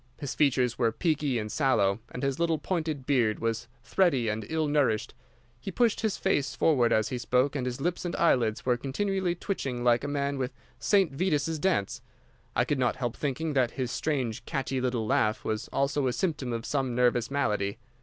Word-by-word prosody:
His 145 - -4
features 130 -5 +2
were 115 -2 +3
peaky 150 -5 0
and 105 -1 -3
sallow, 110 -9 +2
and 125 - -7
his 135 +1 -1
little 165 -1 +2
pointed 155 -5 -2
beard 120 -6 +2
was 115 0 -2 0.2
thready 140 - +2
and 105 0 -3
ill 160 -1 0
nourished. 140 -7 +1 0.5
He 160 - -6
pushed 230 +3 +1
his 220 -3 0
face 145 -8 0
forward 125 -7 +3
as 110 0 +2
he 125 - -3
spoke 125 +4 +1
and 130 -3 -1
his 125 0 -4
lips 175 +5 -1
and 175 -1 -3
eyelids 120 -10 +2
were 125 -1 +2
continually 185 +7 -1
twitching 135 - -3
like 120 0 +3
a - - -2
man 140 -1 -1
with 130 0 -2 0.3
St. 195 -6 +3
Vitus's 155 0 0
dance. 160 - 0 0.5
I - - +3
could 145 - -1
not 125 -1 +2
help 120 -3 -3
thinking 150 +2 -2
that 130 -3 +3
his 125 -2 -1
strange, 130 -8 -2
catchy 135 -1 -2
little 125 -3 -1
laugh 110 0 +1
was 110 +1 -2
also 140 0 0
a 125 - 0
symptom 150 -6 -1
of 115 -1 -3
some 135 -4 -1
nervous 120 -1 +2
malady. 105 -8 0
135 Hz, 195 wpm, -28 LUFS, 120-155 Hz, 0.5 s, were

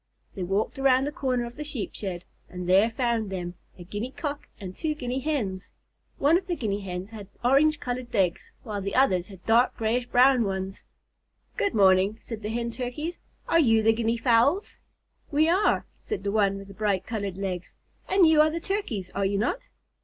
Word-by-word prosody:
They 195 - -6
walked 195 +9 -1
around 265 -1 +4
the 290 - -2
corner 255 -4 -1
of 235 +2 -10
the 300 - -4
Sheep 280 -7 -4
shed, 185 -3 -5 0.2
and 180 -1 -6
there 195 +5 +5
found 230 -3 -1
them, 175 -2 -4 0.2
a 175 - -9
Guinea 205 +7 -4
Cock 290 +1 -5
and 185 -3 -7
two 310 -2 -2
Guinea 255 -2 -3
Hens. 240 -11 -2 0.5
One 315 +5 +4
of 375 - -17
the 350 - -1
Guinea 205 -8 -2
Hens 185 +1 -6
had 210 -3 -9 0.2
orange 290 +4 +4
colored 250 -3 -4
legs, 190 -5 0
while 210 -4 -4
the 195 +1 -3
others 185 -9 +3
had 190 -3 -14
dark 235 +3 +3
grayish 235 +2 0
brown 250 0 +5
ones. 190 -1 -4 0.7
"Good 405 - 0
morning," 195 +1 +4
said 225 -2 -7
the 210 - -4
Hen 235 +1 -2
Turkeys. 255 +8 -4 0.3
"Are 335 - +4
you 225 -7 +4
the 225 +1 +5
Guinea 230 +1 0
Fowls?" 245 - +2 0.5
"We 310 +1 +3
are," 365 +5 +2
said 425 - -5
the 200 - -1
one 200 -2 +2
with 195 0 -10
the - - -10
bright 200 -2 0
colored 200 -5 -4
legs, 185 -3 -4 0.3
"and 380 -3 +5
you 315 -1 +6
are 310 - +4
the 330 +2 -3
Turkeys, 280 - -3
are 200 - -1
you 200 +1 -1
not?" 245 - -1
225 Hz, 200 wpm, -26 LUFS, 195-275 Hz, 0.7 s, you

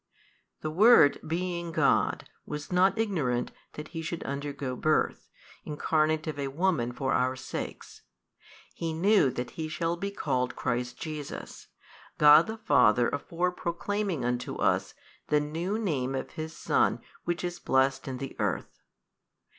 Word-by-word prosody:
The 155 - -3
Word 195 -4 +6
being 170 +1 -2
God, - - +2 0.2
was 150 +2 -6
not 185 +4 +3
ignorant 155 - 0 0.2
that 150 0 -8
He 165 - -5
should 165 +1 -4
undergo 140 -2 -4
birth, 155 +5 0 0.3
Incarnate 155 +1 0
of 155 -3 -4
a 140 - -1
woman 145 -4 0
for 135 +2 -1
our 130 +1 +1
sakes: - - -7 0.7
He 165 -1 -3
knew 190 -1 +4
that 125 -1 -4
He 160 -1 -4
shall 165 +2 -1
be 200 +3 -3
called 125 -10 -1
Christ 120 0 -2
Jesus, 150 -3 -7 0.5
God 150 +2 +8
the 220 0 -5
Father 125 - +4
afore 170 +5 -1
proclaiming 180 -3 -2
unto 125 0 -2
us - - 0 0.3
the 150 - +3
New 165 +7 -2
Name 135 - -1
of 130 - -4
His 160 0 -6
Son - - +2 0.3
which 175 +1 -2
is 175 0 -3
blessed 130 0 +1
in 130 -1 -4
the 135 +1 -5
|221 - - -16
earth 105 -4 0
33. - - -33
155 Hz, 150 wpm, -28 LUFS, 135-175 Hz, 0.7 s, God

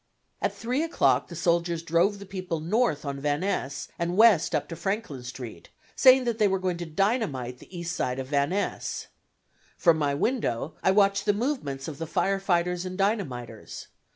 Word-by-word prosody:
At - - 0
3 250 +5 -1
o'clock 330 0 +2
the - - -9
soldiers 170 -1 +1
drove 170 +5 +2
the 200 - -10
people 185 -4 -4
north 170 - 0
on 140 -1 -3
Van 145 +2 0
Ness 140 -8 -2
and 170 +2 -1
west 220 -7 +5
up - - -1
to 165 - -5
Franklin 195 - -3
Street, 125 -1 -8 0.3
saying 260 -1 +7
that 235 -2 -2
they 210 - +5
were 190 0 +1
going 185 -2 -1
to 175 -1 -5
dynamite 160 - -1
the 185 - -11
east 170 0 -3
side 125 0 -1
of 135 - -3
Van 140 +1 +1
Ness. 200 +2 -3 0.7
From 165 -3 +4
my 145 -2 +1
window 155 - -1
I - - +3
watched 200 0 +3
the 205 - +5
movements 205 - -2
of 150 -3 -7
the 165 - -4
fire 195 +4 +1
fighters 180 -2 0
and 185 0 -5
dynamiters. 135 - -3
175 Hz, 185 wpm, -27 LUFS, 145-200 Hz, 0.7 s, saying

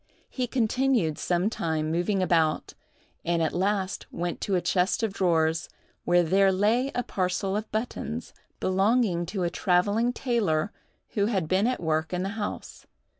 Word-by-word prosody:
He 255 -2 -2
continued 245 - +1
some 175 +2 +1
time 160 -7 -1
moving 180 +3 +1
about, 165 -3 +1 0.5
and 170 -1 +1
at 160 - 0
last 195 +1 -1
went 175 0 -4
to 195 - 0
a - - +3
chest 180 +4 +1
of 215 -3 0
drawers, 165 -3 +1 0.4
where 175 0 +4
there 195 +3 +4
lay 220 +8 +2
a 245 - 0
parcel 190 0 -1
of 215 +1 -3
buttons, 215 - -4 0.3
belonging 190 -2 +2
to 190 0 -2
a 170 - 0
travelling 205 +6 +2
tailor 215 -10 0 0.4
who 205 -1 0
had 190 -8 0
been 190 +6 +2
at 255 - -1
work 160 0 -1
in 180 0 -1
the 195 - -2
house. 210 0 -6
190 Hz, 160 wpm, -27 LUFS, 170-215 Hz, 0.5 s, where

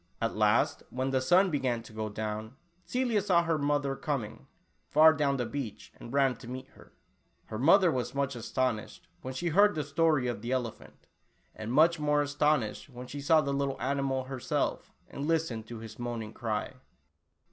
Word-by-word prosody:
At 115 0 -1
last, 105 +1 +2
when 130 +1 -2
the 130 -1 +1
sun 180 +8 +4
began 130 -5 -1
to 115 - -14
go 110 0 -3
down, 110 +2 -5 0.3
Celia 245 -4 0
saw 180 -4 +3
her 165 -2 0
mother 145 -1 0
coming, 135 -7 -4 0.4
far 155 +2 +7
down 140 -3 +1
the 125 - -1
beach, 125 -5 -6
and 115 - -11
ran 135 -2 +3
to 115 - -12
meet 130 +1 -7
her. - - -18 0.5
Her 110 - -6
mother 175 +6 +5
was 125 -1 -3
much 140 -1 -1
as 115 -1 -7
tonished, 130 -5 -1 0.2
when 130 0 -6
she 170 +5 -1
heard 205 +5 +5
the 155 - -1
story 150 -1 +2
of 120 -4 -3
the 120 +2 -4
elephant, 110 - -5 0.5
and 110 +1 -6
much 160 +5 +4
more 150 0 +2
astonished 145 -6 0
when 125 -1 -9
she 140 +3 -7
saw 155 +2 +4
the 140 -2 -2
little 140 -1 -1
animal 135 0 -1
herself, 130 -1 -2 0.2
and 140 +2 -5
listened 155 -10 -1
to 120 - -7
his 110 0 -10
moaning 115 -3 -4
cry. 110 0 -3
135 Hz, 185 wpm, -30 LUFS, 115-150 Hz, 0.5 s, far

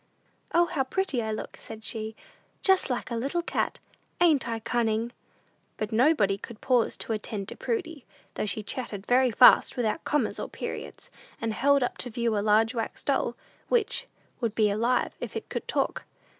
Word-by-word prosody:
"O, 345 +1 +5
how 310 -5 0
pretty 275 -2 0
I 220 -1 -2
look," 215 - -5
said 220 0 -9
she; 220 -1 -3 0.5
"just 380 -5 +4
like 250 0 -2
a - - -1
little 280 +9 -1
cat! - - -1 0.4
Ain't 315 -7 +4
I 230 -1 -1
cunning?" 225 0 0 0.7
But 215 +1 -3
nobody 220 -5 +3
could 225 +1 -9
pause 250 -3 +2
to 225 - -3
attend 210 -2 -4
to - - -6
Prudy, 330 - -3 0.3
though - - -2
she 210 +2 -2
chatted 205 -4 -5
very 255 +1 +4
fast, 245 +3 +6
without 240 +6 0
commas 295 -7 0
or - - -4
periods, - - -7 0.3
and 225 -1 -1
held 280 +3 +3
up 245 - -3
to 250 - -2
view 235 -1 0
a - - +2
large 220 +3 +3
wax 225 -2 -4
doll 270 -4 0 0.3
which 470 -3 +1 0.3
"would 230 -3 -1
be 210 -2 +3
alive 235 +5 +1
if - - -6
it - - -5
could - - -4
talk." - - -1
235 Hz, 180 wpm, -27 LUFS, 220-275 Hz, 0.7 s, fast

